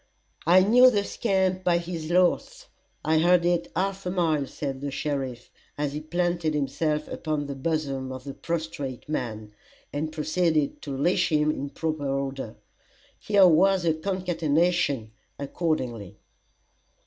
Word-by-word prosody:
"I 180 +2 +7
knew 245 +6 +7
the 205 -4 +1
scamp 190 -4 0
by 175 -1 +3
his 170 -2 -5
laugh 180 0 +1 0.4
I 160 +1 +3
heard 175 +1 +4
it 175 -1 0
half 195 +2 -1
a - - 0
mile," 160 -6 +1
said 135 -2 -5
the 145 - -3
sheriff, 135 -4 -4 0.3
as 145 -1 -2
he 150 - -3
planted 170 -1 -1
himself 150 +2 -1
upon 155 -2 -3
the 140 - -4
bosom 135 -2 -2
of 130 -1 -7
the 140 0 -6
prostrate 155 -7 -4
man, 110 -8 -4 0.4
and 155 +2 -2
proceeded 155 -1 0
to 140 -2 -5
leash 175 +5 +2
him 150 0 +3
in 140 -2 -4
proper 155 -1 -3
order. 135 -3 -3 0.6
Here 200 -2 +5
was 185 +2 +4
a 165 - +3
concatenation 165 - 0 0.3
accordingly. 130 - -3
155 Hz, 140 wpm, -26 LUFS, 140-175 Hz, 0.6 s, I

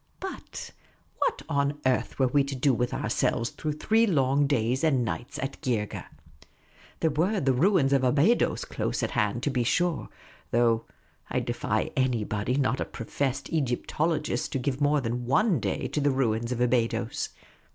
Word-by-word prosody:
But 385 - -7 0.5
what - - 0
on 140 +1 0
earth 130 -1 +1
were 130 - +3
we 140 +3 +3
to 140 0 -4
do 130 +1 +2
with 125 +1 0
our - - -2
selves 115 - 0
through 155 -1 -3
three 220 +9 +2
long 140 -4 +2
days 125 -1 +1
and 135 -7 +3
nights 120 +2 -4
at 135 +1 -5
Geergeh? 115 -8 -2 0.9
There 160 - +3
were 180 +8 +1
the 135 -4 +2
ruins 145 -1 +3
of 135 -1 +3
Abydos 145 - +3
close - - -2
at - - -1
hand, 105 +4 0
to 145 - +1
be 125 -2 +1
sure; 175 +6 0 0.4
though 115 -1 +2 0.4
I - - 0
defy - - -1
anybody 120 -3 0
not 130 -2 +1
a - - -1
professed 130 +5 -3
Egyptologist 150 0 -1
to - - +1
give 135 +2 -2
more 145 0 +3
than 120 0 -3
one 170 - +3
day - - -2
to 150 - -1
the 145 - +3
ruins 120 -3 0
of 125 - -2
Abydos. 120 -2 0
135 Hz, 170 wpm, -27 LUFS, 120-150 Hz, 0.9 s, were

